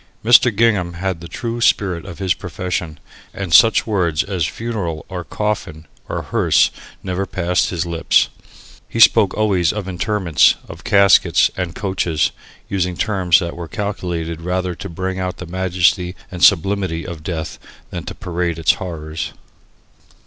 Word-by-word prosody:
Mr. 120 +1 +6
Gingham 100 -6 +2
had 90 0 -3
the 85 - -8
true 120 +5 -4
spirit 90 -7 +1
of 85 - -9
his 95 -1 +1
profession, 90 -3 -4 0.4
and 95 -4 -4
such 115 +1 +6
words 90 -8 0
as 95 -5 -2
"funeral" 100 -9 -4
or 90 -2 -5
"coffin" 85 -3 -3 0.2
or - - -3
"hearse" - - +2 0.3
never 95 +1 -2
passed 90 0 0
his 85 -2 -2
lips. 85 -1 +2 0.6
He - - -4
spoke - - +6
always 95 -6 +2
of 105 -3 -5
"interments," 95 - +2
of - - -11
"caskets," 100 -1 +4
and 90 -2 -4
"coaches," 85 -6 0 0.4
using 90 -3 -2
terms 95 -6 +3
that 85 -3 -3
were 85 -1 -7
calculated 85 -4 -4
rather 90 +1 -2
to - - -8
bring 95 +2 -4
out 90 -1 -3
the 90 - -7
majesty 90 0 0 0.2
and 90 -1 -4
sublimity 95 -3 +3
of 85 -3 -7
death 80 -1 -5 0.3
than - - -5
to - - -7
parade 85 -1 -3
its 80 -1 +3
horrors. 80 -3 -5
90 Hz, 150 wpm, -19 LUFS, 85-100 Hz, 0.6 s, Mr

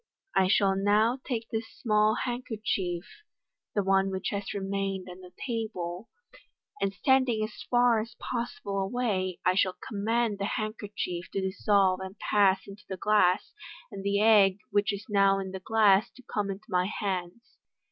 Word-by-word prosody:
I 190 - +4
shall 195 0 +3
now 210 +6 +2
take 230 -4 -3
this 225 0 -2
small 215 -1 +2
handkerchief 215 -7 -2 0.4
" - - -60
(the 205 - +2
one 195 0 +3
which 190 0 -3
has 200 -1 -3
remained 195 -1 -3
on 180 0 -10
the 180 -1 -13
table), 215 -6 -4 0.7
"and 195 - +1
standing 250 0 +2
as 215 - -6
far 245 -2 +4
as 230 +2 -6
possible 235 -5 -4
away, 195 -3 -1
I 185 - +4
shall 185 0 +2
com 200 -2 -5
mand 225 -2 +1
the 200 - -1
handkerchief 205 -5 -4
to 195 - -1
dissolve 190 -1 +2
and 190 +2 -7
pass 195 -2 +3
into 200 +1 -12
the 190 - -4
glass, 200 -2 +2 0.4
and 195 -2 -7
the 200 0 +1
egg 205 -3 +6
which 205 +1 +2
is 200 +1 -6
now 195 -2 +4
in 190 -1 -4
the 190 - -5
glass 210 0 +4
to 255 - -15
come 205 -3 -2
into 195 +1 -6
my 180 -3 +1
hands." 195 +2 -4
200 Hz, 165 wpm, -28 LUFS, 190-220 Hz, 0.7 s, egg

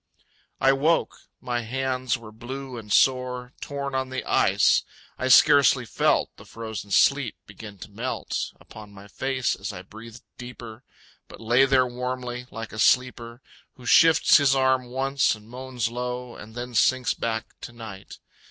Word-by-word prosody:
I 135 - +4
woke. 155 +5 +1 0.2
My 120 -1 -3
hands 130 +1 -2
were 115 -2 -12
blue 130 +4 -8
and 110 -3 -9
sore, 125 0 +1
Torn 140 -1 -5
on 130 0 -2
the 130 - -4
ice. - - +3 0.4
I 130 - -1
scarcely 140 -2 +6
felt - - +1
The - - -13
frozen 110 -3 -7
sleet 130 +4 +3
begin 100 +1 -11
to 100 - -11
melt 120 +5 -4
Upon 105 -1 -13
my 100 +1 -12
face 130 +3 -1
as 95 +2 -6
I 90 -2 -9
breathed 110 +4 -12 0.2
deeper, 120 -2 -10 0.5
But - - -13
lay 120 +4 +3
there 130 -1 +3
warmly, 125 0 -5
like 115 +1 -8
a 110 - -7
sleeper 120 0 +1 0.3
Who 125 - -15
shifts 165 +4 +6
his 140 -2 +3
arm 130 -1 +2
once, 135 +1 0
and 105 0 -17
moans 125 -1 -4
low, 125 0 -5
And 110 +1 -12
then 125 0 -6
sinks 130 +2 +2
back 110 -1 -4
to - - -8
night. 110 -5 -10
125 Hz, 160 wpm, -25 LUFS, 115-130 Hz, 0.5 s, scarcely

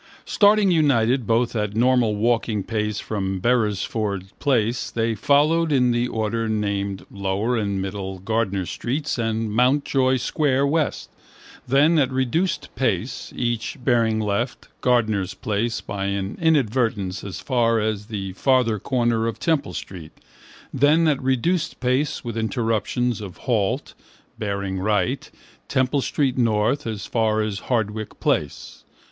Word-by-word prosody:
Starting 205 -1 +4
united 130 - +2
both 115 +1 +1
at 105 -1 -2
normal 120 -2 +3
walking 115 -1 0
pace 105 -1 -2
from 95 -3 -3
Beresford 105 -3 0 0.2
place 120 -4 +1
they 115 0 0
followed 150 +8 +2
in 125 -3 +3
the 120 +1 +1
order 110 0 -2
named 100 -2 -2
Lower 100 +4 -1
and 100 -3 -1
Middle 95 0 -4
Gardiner 100 -1 -1
streets 135 - -3
and 115 -1 -1
Mountjoy 130 +2 +2
square, 135 +1 +1
west: 150 +1 -1 0.6
then, 145 +6 +4
at 135 -2 +2
reduced 130 +8 -1
pace, - - -2
each 120 -2 -2
bearing 115 -4 +2
left, 110 +4 -2
Gardiner's 110 -6 +1
place 115 +3 -2
by 100 -1 -4
an 100 0 -2
inadvertence 115 - +1
as 95 -4 -6
far 115 -3 +1
as 105 -1 -2
the 100 -4 -5
farther 120 -1 +2
corner 120 0 0
of 115 - -3
Temple 160 -4 0
street: 85 -5 -8 0.6
then, 150 +4 +4
at 145 -3 +1
reduced 150 +7 0
pace 130 +3 0
with 120 -3 -5
interruptions 115 +1 -1
of 95 -4 -8
halt, 105 -6 0 0.5
bearing 100 -2 -2
right, 105 +7 0 0.4
Temple 130 +2 +1
street, 135 -1 0
north, 115 +4 +1
as 110 -3 -4
far 110 -2 +1
as 105 -2 -3
Hardwicke 110 -3 -2
place. - - -2
115 Hz, 130 wpm, -23 LUFS, 105-130 Hz, 0.6 s, Starting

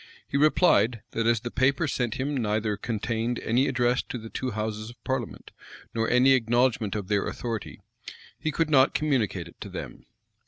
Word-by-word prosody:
He - - -6
replied, 140 - +3
that 115 0 -1
as 115 -2 +3
the 120 - -5
paper 135 +4 +2
sent 120 -5 -1
him 140 +3 -2
neither 110 -3 0
contained 115 +2 -2
any 125 +5 +1
address 125 -1 +1
to - - -3
the 115 -1 -9
two 130 - -3
houses 110 0 -4
of 120 -1 -15
parliament, 130 -4 -4 0.4
nor 115 -1 0
any 125 +2 +5
acknowledgment 120 -3 +2
of 100 -3 -4
their 100 -1 +1
authority, 115 -4 -5 0.6
he 155 - -1
could 160 0 0
not 135 -2 +5
communicate 135 -9 0
it - - -17
to - - -6
them. - - -8
120 Hz, 180 wpm, -26 LUFS, 110-130 Hz, 0.6 s, any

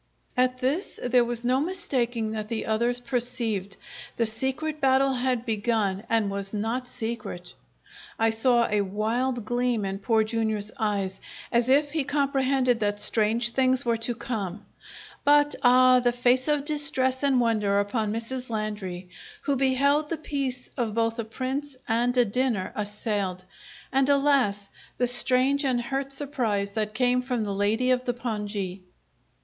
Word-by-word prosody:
At 255 0 +2
this 280 +9 -1
there 245 0 +4
was 240 0 -3
no 255 +2 +3
mistaking 245 -10 -1
that 215 -1 -5
the 230 -2 -3
others 235 +3 0
perceived. 235 -6 -2 0.4
The 230 - +2
secret 265 +7 -2
battle 270 0 +3
had 250 -1 -1
begun 215 -3 0
and 220 -3 +1
was 200 +1 -3
not 230 +5 -2
secret. 225 -7 -5 0.6
I 225 0 +2
saw 235 +1 +3
a 210 -2 +1
wild 225 +5 -1
gleam 240 -2 0
in 195 0 -3
Poor 220 +1 +2
Jr.'s 215 -1 -1
eyes, 200 -3 -1 0.3
as 235 +1 +2
if 285 +2 +4
he 310 -1 0
comprehended 270 -3 +1
that 205 -1 -1
strange 225 +3 +2
things 260 0 +1
were 235 -1 +1
to 235 +1 -2
come; 210 -5 -5 0.6
but, 290 0 +4
ah, 255 0 +6
the 245 -1 +2
face 245 +2 +2
of 295 -2 +1
distress 280 -4 +1
and 275 -3 +3
wonder 210 -4 +2
upon 210 +1 -1
Mrs. 240 +3 -4
Landry, 210 -5 -4 0.4
who 280 -1 +1
beheld 280 +3 +2
the 330 - -2
peace 275 -4 -3
of 225 -4 -2
both 230 0 0
a - - 0
Prince 265 +4 -4
and 240 +2 +1
a 245 - +5
dinner 230 -3 -1
assailed; 205 -3 -3 0.5
and, 270 +1 +2
alas! 275 -8 +2 0.3
the 250 - +2
strange 255 +3 +4
and 255 -3 +1
hurt 270 +3 -3
surprise 245 -8 -1
that 215 0 -3
came 250 +1 +2
from 250 -3 -2
the 200 -1 -3
lady 215 +6 +1
of 255 0 +1
the 245 - -1
pongee! 205 -5 -4
240 Hz, 155 wpm, -26 LUFS, 215-260 Hz, 0.6 s, ah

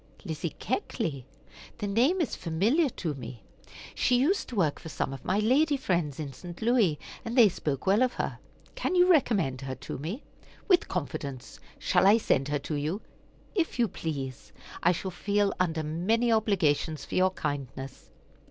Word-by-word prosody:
"Lizzie 160 -2 -4
Keckley? 135 -5 -3 0.5
The 210 - -3
name 250 - +2
is 315 - -1
familiar 215 - +2
to 165 -9 -3
me. 120 -4 -9 0.5
She 245 - +2
used 320 +11 +1
to 245 - -6
work 165 -8 +1
for 160 - -9
some 135 - -2
of 135 - -8
my 190 - +1
lady 275 +8 +3
friends 170 - -1
in 145 -3 -5
St. 175 +6 -9
Louis, 220 -10 +3 0.3
and 230 +3 -4
they 235 -3 +9
spoke 145 -5 -3
well 200 +4 +4
of 255 -1 +3
her. - - -3 0.3
Can - - -1
you 360 0 +6
recommend 210 - +2
her 130 -1 -4
to 130 0 -7
me?" 180 - -5 0.4
"With 365 -4 +4
confidence. 135 -4 -5 0.2
Shall - - +3
I 210 +3 +7
send 135 -11 +1
her 145 0 0
to 145 +3 -5
you?" 155 +8 -2 0.5
"If 345 -10 0
you 240 -2 +3
please. 140 - -5 0.3
I 175 - +5
shall 185 +2 -3
feel 205 +2 +1
under 160 -3 0
many 205 +10 +1
obligations 170 -9 +1
for - - -10
your 185 +1 +4
kindness." 135 - -5
180 Hz, 170 wpm, -28 LUFS, 145-230 Hz, 0.5 s, they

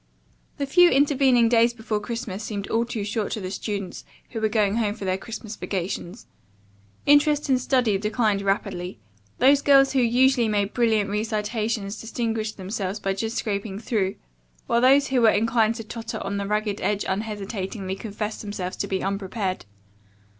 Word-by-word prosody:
The 280 - -1
few 350 +6 +6
intervening 270 -4 +4
days 235 0 +3
before 220 -2 -2
Christmas 220 -2 -5
seemed 200 -2 -4
all 230 +1 +2
too 230 -3 -4
short 210 +1 -2
to - - -3
the 185 -2 -5
students 200 -1 -4 0.3
who 225 - -4
were 220 - +2
going 210 -1 +1
home 210 -3 0
for 205 - -7
their 185 0 +1
Christmas 220 +2 -7
vacations. 185 +1 -4 0.8
Interest 290 0 +4
in 255 - +4
study 245 -6 +1
declined 210 -1 +1
rapidly. 190 - -2 0.4
Those 275 +2 +5
girls 275 -1 +5
who 270 - +2
usually 250 0 +3
made 205 -1 0
brilliant 220 -4 +2
recitations 215 -1 -2
distinguished 225 -2 -3
themselves 195 +1 -4
by 195 -1 -1
just 225 +4 -3
scraping 200 -2 -3
through, 205 -3 -1 0.5
while 235 -2 +2
those 275 +3 +5
who 260 -2 +2
were 225 - +7
inclined 225 +1 +2
to 225 - -6
totter 225 +1 -6
on 200 +1 -3
the 200 0 -3
ragged 210 0 -1
edge 205 -1 0
unhesitatingly 195 -1 -3
confessed 210 +1 -5
themselves 195 -3 -5
to 200 - -2
be 190 -1 -2
unprepared. 195 - -3
215 Hz, 165 wpm, -24 LUFS, 200-235 Hz, 0.8 s, were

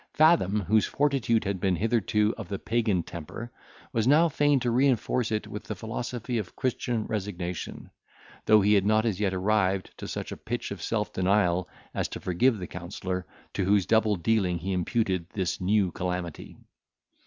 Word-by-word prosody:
Fathom, 150 - +4
whose 105 +4 +2
fortitude 135 -6 +1
had 100 -2 -2
been 95 0 +1
hitherto 105 +1 +1
of - - -7
the 100 +1 -3
pagan 110 -6 0
temper, 85 +9 -8 0.4
was 115 -1 +1
now 155 +5 +6
fain 145 -1 +3
to 120 - 0
reinforce 125 -2 +2
it 105 -1 -1
with 105 - -7
the - - -4
philosophy 120 +1 -3
of 100 - -7
Christian 120 -3 -1
resignation, 95 -5 -4 0.6
though 110 -1 +7
he 105 +2 +4
had 100 -2 +4
not 110 +2 +3
as 105 -5 0
yet 100 -2 +1
arrived 95 0 +1
to - - -7
such - - -5
a - - -6
pitch - - -4
of - - -6
self - - -2
denial 95 -2 +2 0.2
as - - -1
to - - -7
forgive 110 +7 +2
the 90 - -5
counsellor, 90 +1 -5 0.3
to 100 - -1
whose 100 0 +3
double 110 -2 +3
dealing 95 -1 +1
he 95 +3 -3
imputed 90 -1 0
this 95 -3 -1
new 95 0 +2
calamity. 90 -3 -4
105 Hz, 175 wpm, -27 LUFS, 90-115 Hz, 0.6 s, though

